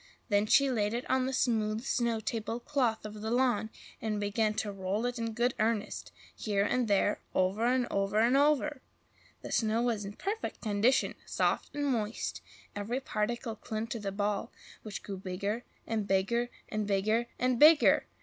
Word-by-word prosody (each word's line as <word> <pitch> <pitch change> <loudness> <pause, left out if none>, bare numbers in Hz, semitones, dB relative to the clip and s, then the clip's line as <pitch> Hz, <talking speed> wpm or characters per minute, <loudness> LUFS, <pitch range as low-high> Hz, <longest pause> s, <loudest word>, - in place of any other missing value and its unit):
Then 205 0 +3
she 275 +4 +5
laid 215 -2 0
it 240 - -4
on 260 0 +2
the - - -1
smooth 220 -4 +1
snow 235 -4 +1
table 225 +1 -3
cloth 245 -5 0
of 210 0 -7
the 220 - -3
lawn, 240 -3 +2 0.3
and 215 -1 -1
began 210 +1 0
to 210 - -2
roll 195 +3 -2
it 245 -1 -2
in 230 -1 -2
good 240 +2 +1
earnest, 215 -1 -1 0.2
here 200 -2 0
and 245 +1 +1
there, 205 0 +2
over 195 +5 +2
and 250 0 +2
over 195 +1 0
and 235 +4 +4
over. 290 -1 +2 0.6
The - - -6
snow 225 +1 +1
was 230 -4 0
in 200 +1 -6
perfect 415 - -4
condition, 220 +4 +2
soft - - 0
and 290 0 -1
moist; 230 -5 -2 0.3
every 215 +5 -2
particle 230 -1 -2
clung 220 0 -4
to 230 - -3
the 200 -2 -3
ball, 205 0 -1 0.3
which 215 -2 -7
grew 195 -2 -5
bigger 200 +5 -3 0.2
and 220 -3 -2
bigger 235 +6 +1 0.2
and 215 -1 -2
BIGGER 215 +4 +1
and 250 -1 +1
BIGGER! 305 +1 +7
220 Hz, 175 wpm, -31 LUFS, 205-245 Hz, 0.6 s, BIGGER